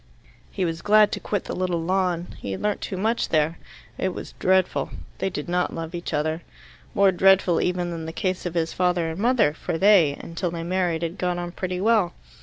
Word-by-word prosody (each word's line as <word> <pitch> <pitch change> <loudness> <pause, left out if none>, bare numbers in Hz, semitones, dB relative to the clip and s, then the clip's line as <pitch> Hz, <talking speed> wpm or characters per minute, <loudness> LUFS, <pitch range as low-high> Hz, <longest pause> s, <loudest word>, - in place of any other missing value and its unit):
He 185 - -2
was 165 0 -3
glad 210 0 +5
to - - -2
quit 205 -3 -2
the - - -5
little 180 -2 -1
lawn. 180 0 0
He 100 - -4
had - - -5
learnt 210 -1 0
too 190 - -4
much 225 +5 0
there. 155 +1 +1 0.4
It 185 -1 -1
was - - -7
dreadful: 185 -1 +2 0.3
they 190 - 0
did 150 -5 -5
not 180 +1 0
love 165 0 -5
each 175 0 -5
other. 155 +2 -1 0.5
More 200 -1 +5
dreadful 190 -1 +4
even 180 -1 -1
than 165 -1 -5
the - - -4
case 185 +1 -2
of 175 - -6
his 165 -1 0
father 180 -2 +1
and 160 - -7
mother, 230 - +3
for 165 +1 -3
they, 185 -7 +5
until 170 +1 -4
they 165 0 -5
married, 175 -2 0
had 170 +3 -4
got 180 -1 0
on 175 0 -4
pretty 185 0 -3
well. 210 -4 +3
180 Hz, 210 wpm, -24 LUFS, 165-190 Hz, 0.5 s, glad